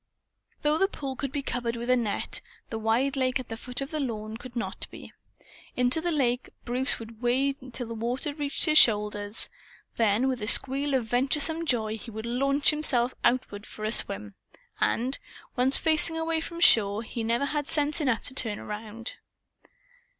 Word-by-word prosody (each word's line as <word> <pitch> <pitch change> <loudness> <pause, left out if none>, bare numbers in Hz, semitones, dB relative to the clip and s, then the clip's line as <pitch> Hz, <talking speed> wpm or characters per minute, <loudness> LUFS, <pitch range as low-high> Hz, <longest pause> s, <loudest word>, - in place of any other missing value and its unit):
Though 300 +1 +2
the 390 - +4
pool 275 -9 -6
could 275 0 -4
be 280 0 -3
covered 240 -2 -2
with 235 +1 -5
a 255 - +4
net, 230 -5 -2 0.3
the 225 - -3
wide 235 +6 +1
lake 260 -1 +1
at 255 - -8
the 225 - -4
foot 250 +3 -8
of 275 - -5
the 310 - -2
lawn 220 -5 -4
could 245 +1 -10
not 235 - -4
be. - - -12 0.6
Into 250 +5 +2
the 345 +1 -1
lake 250 -5 0 0.2
Bruce 255 +2 0
would 225 0 -11
wade 260 +2 0
till 245 +1 -4
the 230 - -5
water 245 +6 -3
reached 290 0 0
his 310 -2 +7
shoulders. 210 -1 +3 0.5
Then 225 +3 +2
with 255 -3 -2
a 210 - -3
squeal 275 +4 +3
of 250 -3 0
venturesome 295 +7 +1
joy, 220 -4 0
he 235 - -8
would 220 0 -7
launch 275 +5 +2
himself 260 -5 0
outward 220 -4 0
for 215 - -7
a 215 - 0
swim; 100 - +3 0.5
and, 255 +4 0 0.4
once 255 +2 +4
facing 320 +1 +5
away 325 0 -1
from 335 +1 -7
shore, 210 - +5
he 230 0 -5
never 235 +4 +1
had 290 0 -1
sense 300 +1 +1
enough 260 -6 0
to - - -3
turn 225 -5 -2
around. 220 +2 -6
250 Hz, 185 wpm, -27 LUFS, 225-280 Hz, 0.6 s, his